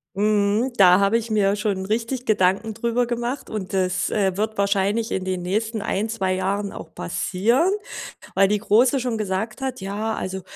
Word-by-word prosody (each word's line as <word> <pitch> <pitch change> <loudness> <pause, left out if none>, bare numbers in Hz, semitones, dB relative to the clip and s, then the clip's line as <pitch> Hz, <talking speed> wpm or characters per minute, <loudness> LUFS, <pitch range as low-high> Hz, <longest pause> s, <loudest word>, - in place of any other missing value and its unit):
Mhm, 210 +4 +1
da 185 -3 +6
habe 200 +3 +3
ich 230 -1 -5
mir 200 -2 +2
schon 205 -3 -2
richtig 230 +5 -2
Gedanken 205 +1 +2
drüber 235 +2 0
gemacht 240 +3 -3
und 205 -4 -5
das, 185 -1 0
äh, 195 -3 +1
wird 215 +2 -2
wahrscheinlich 200 +3 +1
in 190 - -1
den 185 -1 -2
nächsten 215 +4 -2
ein, 210 +3 -1
2 195 -4 -1
Jahren 195 +2 -2
auch - - -10
passieren, 230 - +1 0.7
weil 195 +1 +6
die 210 +1 0
Große 240 +5 +3
schon 240 -3 -2
gesagt 215 +3 -3
hat: 265 -3 -3
„Ja, 205 +3 -3
also, 190 0 -4
210 Hz, 175 wpm, -23 LUFS, 190-230 Hz, 0.7 s, da